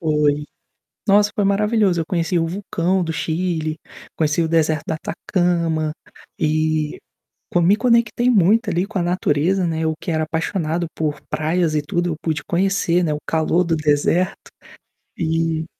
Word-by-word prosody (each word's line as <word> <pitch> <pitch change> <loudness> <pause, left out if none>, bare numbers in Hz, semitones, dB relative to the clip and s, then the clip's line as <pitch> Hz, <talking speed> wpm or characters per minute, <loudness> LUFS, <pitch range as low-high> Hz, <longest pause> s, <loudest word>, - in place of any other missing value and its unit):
Foi. 150 -2 +1 0.6
Nossa, 205 +1 +4
foi 205 - 0
maravilhoso, 200 -2 +2
eu 160 - -1
conheci 170 0 0
o 165 - +1
vulcão 185 0 -1
do 165 -1 -2
Chile, 160 0 -2 0.4
conheci 155 +1 +1
o 165 - -1
deserto 160 -2 +1
da 160 - -1
Atacama, 170 -2 -1 0.5
e 155 0 0 0.5
co 175 - +2
me 180 +4 +5
conectei 235 +1 +2
muito 215 +1 +3
ali, 175 +2 0
com 205 -3 -3
a - - +1
natureza, 175 +1 +1
né, 160 -1 -2
eu 160 0 +1
que 180 - -4
era 155 -1 0
apaixonado 165 +1 -2
por 155 -2 -2
praias 160 0 0
e 150 - +2
tudo, 170 +2 -1
pude 155 -2 -2
conhecer, 180 -1 +1
né, 155 -3 0
o 150 - -2
calor 165 +2 +1
do 165 - +1
deserto, 155 +4 0 0.7
e 165 -1 -1
165 Hz, 155 wpm, -20 LUFS, 155-185 Hz, 0.7 s, me